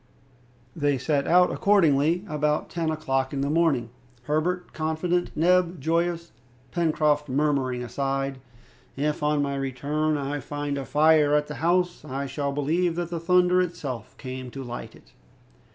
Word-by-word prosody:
They 145 -2 +1
set 140 +2 0
out 180 +1 +5
accordingly 170 -2 +3
about 150 -1 -1
ten 165 -2 -1
o'clock 135 -4 -1
in 135 - -1
the 140 +1 0
morning, 150 -8 +1 0.3
Herbert 170 +6 -1
confident, 160 +3 -1
Neb 180 +1 +3
joyous, 170 +3 -1 0.4
Pencroft 155 -3 +1
murmuring 135 -3 0
aside, 135 +2 -2 0.6
"If, 150 +2 -1
on 150 -1 +1
my 140 0 -2
return, 145 +3 -1
I 145 +1 -3
find 145 +1 -4
a 135 - -5
fire 150 0 +4
at 150 0 +2
the 150 - -7
house, 175 +1 +1
I 140 -1 -4
shall 140 +1 -2
believe 165 +5 0
that 175 0 -3
the 170 - -2
thunder 180 +1 +3
itself 135 - -5
came 130 -1 -6
to 135 +2 -7
light 120 -1 -7
it." - - -21
150 Hz, 150 wpm, -25 LUFS, 140-170 Hz, 0.6 s, out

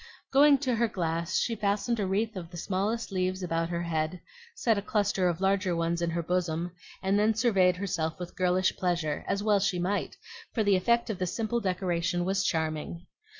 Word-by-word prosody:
Going 285 +1 +6
to 260 -3 0
her 235 +1 +3
glass, 170 -3 -1
she 235 - +1
fastened 210 +3 0
a 200 - 0
wreath 210 +3 0
of 175 -3 -6
the 175 - -9
smallest 200 +6 -2
leaves 185 0 -1
about 165 -1 -1
her 170 0 -2
head, 160 +1 -2 0.4
set 230 -2 +2
a 200 - -1
cluster 200 -3 +1
of 170 -1 -2
larger 195 -2 +2
ones 170 +1 0
in 170 - 0
her 170 0 -2
bosom, 175 0 -1 0.3
and 195 +2 +2
then 215 +1 +3
surveyed 195 -6 +3
herself 170 -4 -2
with 180 -1 -7
girlish 185 0 +2
pleasure, 170 -5 -1
as 200 +1 -1
well 210 -2 +3
she 190 -2 0
might; 185 +4 -2 0.4
for 220 - +2
the 200 -1 +4
effect 235 +5 +2
of 195 - -6
the 185 - 0
simple 225 +5 -1
decoration 180 -3 -1
was 195 +1 +1
charming. 160 +1 -2
185 Hz, 195 wpm, -29 LUFS, 170-205 Hz, 0.4 s, Going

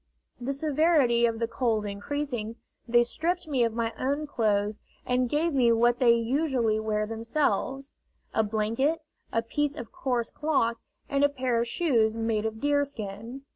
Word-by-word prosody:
The 250 +2 -2
severity 280 -4 +3
of 230 -1 -2
the 230 0 -1
cold 230 -3 0
increasing, 230 +2 -4 0.3
they 240 0 +5
stripped 345 +7 -2
me 270 -5 +1
of 230 -1 0
my 230 -1 -1
own 285 +4 -1
clothes 210 -5 0 0.3
and 250 0 +1
gave 315 +4 +1
me 245 -4 +4
what 240 +1 +3
they 240 -3 +6
usually 235 -2 +1
wear 215 -1 -1
themselves 265 +4 -1 0.4
a - - +3
blanket, 230 +9 0 0.3
a 230 - 0
piece 295 +5 -1
of 235 -5 -8
coarse 250 -9 -2
cloth, 270 -7 0 0.3
and 280 0 +1
a 285 - +5
pair 255 -4 0
of 235 - -1
shoes 230 -7 +1
made 225 -1 0
of 220 0 -6
deerskin. 265 -4 -2
240 Hz, 160 wpm, -27 LUFS, 225-285 Hz, 0.4 s, they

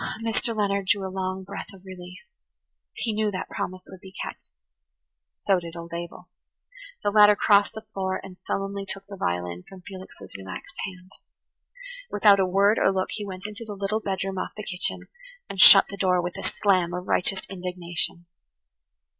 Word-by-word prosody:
Mr. 225 0 0
Leonard 200 -2 +1
drew 195 0 +2
a 185 - -8
long 190 0 -2
breath 200 +1 -7
of 190 0 -18
relief. 185 0 -10 0.7
He 225 - -2
knew 215 0 +1
that 185 -2 -4
promise 185 0 -4
would 190 - -12
be 190 - -11
kept. - - -8 0.9
So 195 -2 +2
did 170 -1 -9
old 170 0 -8
Abel. 170 0 -6 0.8
The 205 - +2
latter 210 0 +8
crossed 205 -1 +4
the 220 +1 -8
floor 190 -1 -1
and 185 -2 -10
sullenly 195 0 -2
took 195 0 -6
the 200 0 -9
violin 90 - -2
from 190 -1 -12
Felix's 190 0 -10
relaxed 95 - -8
hand. 185 0 -12 1.0
Without 205 -1 +5
a 190 - +3
word 200 +4 +4
or - - +4
look 190 -1 -1
he 210 - -4
went 190 0 -7
into 210 +2 -6
the 210 -2 -7
little 200 +2 -1
bedroom 195 -2 -2
off - - -4
the 210 - -5
kitchen 185 -2 -2 0.4
and 190 - 0
shut 195 - +11
the 200 - -7
door 185 -2 +3
with 175 0 -2
a - - -6
slam 180 +1 +1
of 180 +1 -5
righteous 190 +1 0
indignation. 180 -1 -3
190 Hz, 180 wpm, -26 LUFS, 180-200 Hz, 1.0 s, shut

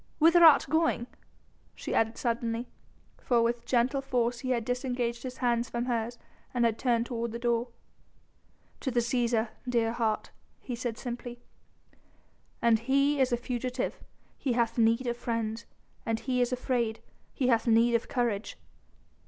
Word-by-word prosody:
Whither 335 +2 +6
art 315 -3 +8
going?" 315 -4 +1 0.7
she - - -5
added 225 0 +1
suddenly, 235 0 -2 0.5
for 235 -2 +2
with 235 0 -1
gentle 255 +3 +2
force 245 -3 0
he 255 - -4
had 235 -3 0
disengaged 245 -1 -2
his 255 0 -6
hands 240 -1 0
from 235 0 -2
hers 240 -1 -2 0.4
and 240 -1 +3
had 225 -1 +1
turned 235 -2 +1
toward 235 -2 -3
the - - -3
door. 235 0 0 1.1
"To 265 - -2
the 245 -1 +1
Cæsar, 235 -2 +1 0.2
dear 230 -2 +2
heart," 225 -2 -1 0.3
he 250 - -5
said 235 -1 -4
simply; 245 -1 -6 1.2
"an 230 -1 +5
he 275 +5 +2
is 260 -1 +2
a 240 - +2
fugitive 250 +1 -3 0.4
he 260 - 0
hath 235 -1 +1
need 230 +3 +3
of 240 -1 -1
friends: 230 -1 -3 0.4
an 225 -1 -1
he 250 +1 -1
is 245 +1 +1
afraid, 245 -3 -1 0.3
he 255 -3 0
hath 230 -1 +2
need 230 +1 +4
of 230 - +1
courage." 235 -5 -1
240 Hz, 155 wpm, -29 LUFS, 230-250 Hz, 1.2 s, art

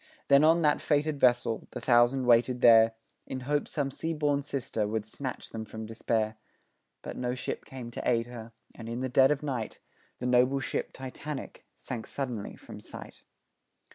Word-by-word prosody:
Then, 140 +1 +7
on 165 +2 +5
that 150 -1 +3
fated 150 -1 +1
vessel, 120 -3 +2
the - - -4
thousand 120 +1 +4
waited 120 +1 +4
there 115 -1 +7 0.3
In 130 - -5
hope 145 +3 0
some 140 -3 -2
sea 165 +4 -3
born 145 -2 +1
sister 130 -6 -2
would 110 0 -2
snatch 130 +3 -6
them 110 - -5
from 110 0 -7
despair, 110 0 -1 0.7
But - - -6
no 125 0 -1
ship 125 - -4
came 125 -3 -8
to - - -2
aid 115 -1 +2
her, 115 -2 -9 0.2
and, 115 -1 -9
in 120 +2 -3
the 130 - -1
dead 130 +1 +5
of 150 0 0
night, 125 -7 -3 0.4
The 125 - -5
noble 125 +2 +3
ship 135 - -3
Titanic 135 +2 -7
sank 120 -4 -6
suddenly 125 -7 -4
from - - -11
sight. - - -10
125 Hz, 175 wpm, -29 LUFS, 115-140 Hz, 0.7 s, Then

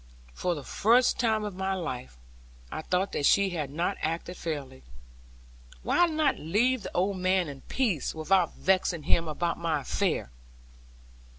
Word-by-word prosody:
For 175 - -1
the 145 - -7
first 240 - +3
time 220 -3 +2
of 210 -2 -4
my 190 +1 -2
life, 125 - -5 0.5
I - - -4
thought 185 +4 0
that - - -2
she 200 -1 +4
had 155 -6 -3
not 170 +7 -1
acted 170 +2 -3
fairly. 145 - -5 1.0
Why 350 - +3
not 310 -4 +1
leave 230 +10 +1
the 190 - -7
old 190 +2 +1
man 185 -1 +2
in 140 -2 -8
peace, 215 - 0
without 175 +3 +2
vexing 185 -4 +1
him 165 +3 +2
about 170 +2 -2
my 165 -3 0
affair? 165 - -1
180 Hz, 155 wpm, -28 LUFS, 155-200 Hz, 1.0 s, she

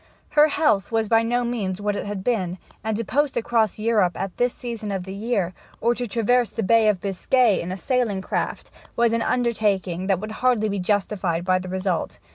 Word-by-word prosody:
Her 300 0 +5
health 285 - +1
was 225 -1 +1
by 225 +1 +4
no 240 +2 0
means 210 -6 -2
what 205 0 -1
it 205 - -4
had 200 -2 -4
been, 190 -7 -1 0.3
and 220 -1 -1
to 230 - -2
post 290 +3 0
across 225 -3 +1
Europe 215 -5 +1
at 195 -1 -4
that 245 +1 +3
season 230 -4 -6
of 190 -2 -2
the 190 +1 -7
year, 200 -4 -1 0.3
or 235 +2 +2
to 245 0 -4
traverse 235 +2 +2
the 225 - -3
Bay 225 +3 +4
of 200 -3 +1
Biscay 205 +3 +2
in 175 - -5
a 185 - -4
sailing 225 -4 0
craft, - - -3 0.2
was 235 -1 +3
an 230 - +1
undertaking 205 -7 0
that 190 -3 +2
would 215 +2 -6
hardly 225 -2 +1
be 200 -1 -2
justified 185 -3 0
by 185 0 +3
the 185 0 -7
result. 185 -2 -2
215 Hz, 210 wpm, -23 LUFS, 190-235 Hz, 0.3 s, Her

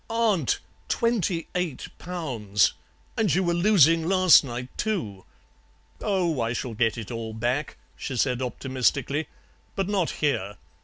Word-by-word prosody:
"'Aunt! 220 - +1 0.3
Twenty 195 -8 0
eight 180 -7 -2
pounds! 125 - 0 0.4
And 215 -5 +1
you 190 - +2
were 175 -1 +1
losing 170 -3 +4
last 185 -3 +6
night 125 -1 -6
too.' 140 - -3 0.8
"'Oh, 175 - 0
I 115 +1 0
shall 125 0 -4
get 115 +1 +1
it 115 0 -6
all 115 -1 -5
back,' 125 +6 -2 0.2
she 130 - -5
said 125 +1 +1
optimistically; 130 +4 -1 0.5
'but 195 -2 -1
not 195 -5 +1
here. 105 -9 -1
150 Hz, 135 wpm, -26 LUFS, 120-185 Hz, 0.8 s, last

